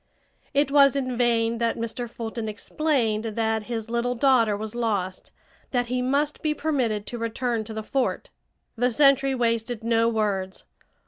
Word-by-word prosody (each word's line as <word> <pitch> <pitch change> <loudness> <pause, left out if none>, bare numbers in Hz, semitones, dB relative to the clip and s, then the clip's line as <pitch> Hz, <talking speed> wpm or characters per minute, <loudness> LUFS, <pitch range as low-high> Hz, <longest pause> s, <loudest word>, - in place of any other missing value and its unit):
It 280 -1 +2
was 280 -1 +6
in 255 -2 -1
vain 230 -1 +1
that 230 -1 0
Mr. 230 +1 -4
Fulton 225 -1 -5
explained 225 -1 0
that 220 -1 -1
his 225 -2 -3
little 235 +1 -1
daughter 230 -5 +3
was 215 +1 -5
lost, 205 -6 -2 0.4
that 245 -2 0
he 250 - +1
must 285 +4 0
be 305 -1 0
permitted 250 -10 -1
to 240 - -6
return 230 0 -1
to 220 - -8
the 220 - -4
fort. 265 +3 -2 0.4
The 245 +2 +2
sentry 275 +1 +4
wasted 230 -1 -1
no 230 0 +3
words. 200 -4 -2
235 Hz, 155 wpm, -25 LUFS, 220-255 Hz, 0.4 s, was